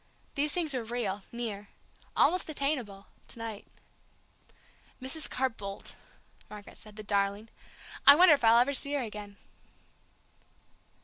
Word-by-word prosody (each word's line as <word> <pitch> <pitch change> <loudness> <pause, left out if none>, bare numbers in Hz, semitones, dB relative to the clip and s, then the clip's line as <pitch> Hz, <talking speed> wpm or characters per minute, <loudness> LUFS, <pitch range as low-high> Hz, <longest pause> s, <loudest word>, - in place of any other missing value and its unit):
These 290 +1 0
things 320 -4 -1
were 250 -3 -2
real, 220 -4 -3
near 215 -4 -5 0.5
almost 365 -1 +2
attainable 260 -10 -3 0.2
to - - -10
night. 225 -3 -7 1.3
"Mrs. 275 +4 0
Carr 265 +1 0
Boldt!" 200 -3 -7 0.6
Margaret 210 -1 -12
said, 215 -2 -13
"the 215 - -8
darling! 200 +1 -1 0.6
I 280 - +12
wonder 350 0 +7
if 285 - 0
I'll 225 +1 +6
ever 250 +4 +3
see 280 +1 +3
her 285 - 0
again!" 210 -2 -8
230 Hz, 130 wpm, -29 LUFS, 205-280 Hz, 1.3 s, I